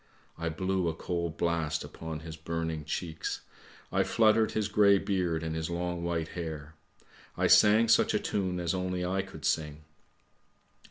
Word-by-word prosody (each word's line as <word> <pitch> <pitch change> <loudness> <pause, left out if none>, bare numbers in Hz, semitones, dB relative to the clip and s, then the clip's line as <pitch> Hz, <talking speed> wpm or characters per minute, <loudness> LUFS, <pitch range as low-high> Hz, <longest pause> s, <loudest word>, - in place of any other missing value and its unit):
I 85 0 -3
blew 95 +2 -1
a 80 - -1
cold 85 -2 -3
blast 80 -3 0
upon 80 -1 -7
his 80 -1 -8
burning 80 -1 -3
cheeks, 80 0 -4 0.5
I - - +2
fluttered 110 0 +3
his 110 -2 0
grey 105 -1 +5
beard 90 -5 -1
and 80 0 -3
his 80 0 -3
long 85 0 -3
white 85 -2 -1
hair; 80 -3 -6 0.6
I - - +1
sang 110 +2 +6
such 115 - +4
a - - +3
tune 95 -3 -1
as 85 -2 -1
only 90 -1 -2
I 95 +2 0
could 95 - -9
sing. 75 0 -1
85 Hz, 160 wpm, -30 LUFS, 80-95 Hz, 0.6 s, sang